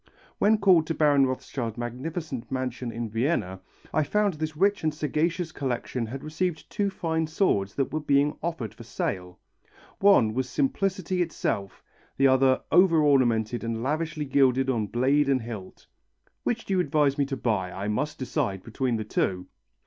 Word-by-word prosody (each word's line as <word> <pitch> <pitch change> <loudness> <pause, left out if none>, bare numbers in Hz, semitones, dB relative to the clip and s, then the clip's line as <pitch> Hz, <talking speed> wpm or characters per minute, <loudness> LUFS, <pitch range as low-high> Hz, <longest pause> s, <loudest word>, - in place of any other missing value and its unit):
When 215 +2 +4
called 185 -6 +4
to 165 - -1
Baron 145 -3 +4
Rothschild's 125 -3 -4
magnificent 130 +2 -5
mansion 130 -2 -3
in 115 +1 -4
Vienna, 110 - -1 0.3
I 155 - +3
found 205 +5 +1
this 155 0 -4
rich 200 +2 +2
and 155 - +2
sagacious 160 +3 -1
collector 125 -3 -3
had 130 +4 -7
received 160 +1 -3
two 200 -1 0
fine 160 -4 -1
swords 125 - 0
that 135 - -1
were 155 - 0
being 145 0 +2
offered 160 - -3
for - - -14
sale. 90 -2 -4 0.6
One 190 - +5
was 130 +2 -2
simplicity 190 - 0
itself, 100 - -3 0.3
the 135 - +3
other 130 0 +4
over 175 -1 +5
ornamented 120 -5 +2
and 115 0 -3
lavishly 155 +2 -2
gilded 135 -1 +3
on 110 -4 -1
blade 135 +6 +2
and 130 -3 +2
hilt. 110 -5 -8 0.6
"Which 235 -1 -2
do 195 - -2
you 185 - +2
advise 145 -3 +2
me 140 - +3
to 135 -1 -3
buy? 105 -7 -1
I 95 +3 -5
must 145 +9 -2
decide 100 -7 -2
between 120 +1 -1
the 110 - -2
two." 95 -3 -1
135 Hz, 165 wpm, -26 LUFS, 120-160 Hz, 0.6 s, One